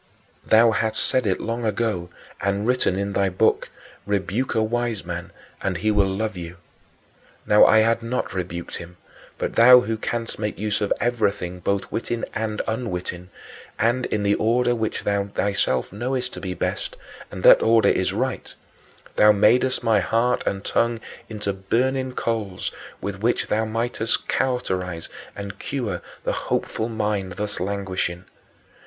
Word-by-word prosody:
Thou 115 Hz, +1 st, +5 dB
hast 110 Hz, 0 st, 0 dB
said 130 Hz, -4 st, +2 dB
it 95 Hz, -, +1 dB
long 115 Hz, +1 st, -3 dB
ago 105 Hz, -5 st, -1 dB, 0.3 s
and 100 Hz, +2 st, 0 dB
written 125 Hz, -7 st, +2 dB
in 100 Hz, 0 st, -2 dB
thy 100 Hz, 0 st, +2 dB
Book, 90 Hz, -, +1 dB, 0.4 s
"Rebuke 100 Hz, +5 st, -1 dB
a 110 Hz, -, +3 dB
wise 115 Hz, -2 st, -1 dB
man, 85 Hz, 0 st, -5 dB, 0.3 s
and 95 Hz, -2 st, -1 dB
he 110 Hz, +5 st, +1 dB
will 100 Hz, -2 st, +3 dB
love 105 Hz, +2 st, -2 dB
you." 85 Hz, 0 st, -7 dB, 0.9 s
Now 105 Hz, -, +7 dB
I 110 Hz, -, +6 dB
had 115 Hz, +1 st, +2 dB
not 115 Hz, -1 st, -2 dB
rebuked 85 Hz, -2 st, -4 dB
him; 85 Hz, +1 st, -10 dB, 0.4 s
but -, -, -2 dB
thou 125 Hz, +2 st, +8 dB
who 115 Hz, -2 st, -2 dB
canst 115 Hz, 0 st, -3 dB
make 105 Hz, -1 st, -2 dB
use 105 Hz, +1 st, -1 dB
of 105 Hz, -, -1 dB
everything, 100 Hz, -7 st, 0 dB
both 100 Hz, +2 st, -1 dB
witting 115 Hz, 0 st, -3 dB
and 110 Hz, -1 st, -2 dB
unwitting, 90 Hz, -6 st, -4 dB, 0.5 s
and 120 Hz, +3 st, +1 dB
in 105 Hz, -, -1 dB
the 100 Hz, 0 st, +3 dB
order 120 Hz, +3 st, +2 dB
which 110 Hz, -2 st, -2 dB
thou 100 Hz, -1 st, +1 dB
thyself 100 Hz, -9 st, 0 dB
knowest 125 Hz, +4 st, -2 dB
to -, -, -7 dB
be 90 Hz, -2 st, -4 dB
best -, -, -3 dB, 0.3 s
and -, -, -8 dB
that -, -, +8 dB
order 115 Hz, 0 st, +5 dB
is -, -, +1 dB
right -, -, -2 dB, 0.7 s
thou 105 Hz, -, +7 dB
madest 120 Hz, +6 st, +3 dB
my 110 Hz, -3 st, +4 dB
heart 115 Hz, +6 st, +1 dB
and 95 Hz, 0 st, -2 dB
tongue 115 Hz, 0 st, +1 dB, 0.3 s
into 105 Hz, -2 st, -3 dB
burning 130 Hz, +7 st, 0 dB
coals 110 Hz, -7 st, -2 dB, 0.3 s
with 100 Hz, -1 st, -5 dB
which 120 Hz, +2 st, +1 dB
thou 110 Hz, +1 st, +1 dB
mightest 115 Hz, 0 st, -1 dB
cauterize 95 Hz, -10 st, -1 dB, 0.3 s
and 100 Hz, 0 st, -7 dB
cure 110 Hz, -11 st, -3 dB, 0.2 s
the -, -, 0 dB
hopeful 110 Hz, +1 st, -2 dB
mind 105 Hz, -4 st, -2 dB
thus 105 Hz, +1 st, -4 dB
languishing. 95 Hz, -2 st, -2 dB
105 Hz, 155 wpm, -23 LUFS, 95-115 Hz, 0.9 s, thou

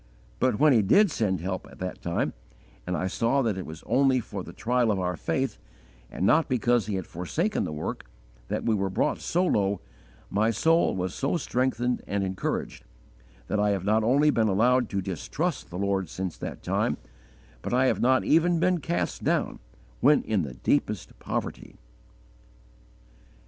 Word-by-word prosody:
But -, -, +2 dB
when 150 Hz, 0 st, +5 dB
He 115 Hz, -, +5 dB
did 180 Hz, -, +4 dB
send 95 Hz, -, 0 dB
help 95 Hz, +1 st, -4 dB
at -, -, -15 dB
that 90 Hz, 0 st, -5 dB
time, 85 Hz, 0 st, -1 dB, 0.5 s
and 90 Hz, -1 st, -1 dB
I -, -, -1 dB
saw 120 Hz, +8 st, +1 dB
that 110 Hz, -4 st, 0 dB
it 95 Hz, -, -6 dB
was 80 Hz, 0 st, -9 dB
only 135 Hz, -1 st, +3 dB
for 105 Hz, -4 st, -6 dB
the -, -, -9 dB
trial 120 Hz, 0 st, +1 dB
of 100 Hz, -3 st, +1 dB
our 90 Hz, 0 st, -1 dB
faith, -, -, -2 dB, 0.5 s
and 90 Hz, -, -2 dB
not 155 Hz, +8 st, +4 dB
because 120 Hz, -3 st, +2 dB
He 105 Hz, -, -1 dB
had 95 Hz, -2 st, -3 dB
forsaken 160 Hz, -, -2 dB
the -, -, -4 dB
work, 75 Hz, -4 st, -4 dB, 0.4 s
that -, -, -2 dB
we 115 Hz, -, +3 dB
were 100 Hz, -2 st, 0 dB
brought 95 Hz, -, 0 dB
so 180 Hz, +2 st, 0 dB
low, 100 Hz, -, +1 dB, 0.5 s
my 105 Hz, +3 st, +2 dB
soul 160 Hz, -, +3 dB
was 90 Hz, -1 st, -2 dB
so 140 Hz, +6 st, 0 dB
strengthened 125 Hz, -3 st, 0 dB
and 100 Hz, 0 st, -1 dB
encouraged 95 Hz, 0 st, -3 dB, 0.6 s
that 105 Hz, -, -1 dB
I 105 Hz, 0 st, +3 dB
have 95 Hz, -2 st, -1 dB
not 110 Hz, +2 st, +3 dB
only 140 Hz, +6 st, +4 dB
not -, -, -5 dB
been 110 Hz, -, +3 dB
allowed 120 Hz, +4 st, +3 dB
to 100 Hz, -1 st, -2 dB
distrust 135 Hz, -, -3 dB
the 90 Hz, -, -6 dB
Lord 95 Hz, -2 st, 0 dB
since 95 Hz, +1 st, -4 dB
that -, -, -7 dB
time, -, -, 0 dB, 0.6 s
but -, -, -5 dB
I 130 Hz, +2 st, +3 dB
have -, -, +1 dB
not 130 Hz, +1 st, +4 dB
even 165 Hz, +2 st, +3 dB
been 180 Hz, +1 st, +2 dB
cast 170 Hz, +3 st, -2 dB
down -, -, 0 dB, 0.4 s
when 145 Hz, +4 st, +5 dB
in 105 Hz, -4 st, 0 dB
the 70 Hz, -6 st, -5 dB
deepest -, -, -1 dB
poverty." -, -, -5 dB
110 Hz, 180 wpm, -27 LUFS, 95-130 Hz, 0.6 s, when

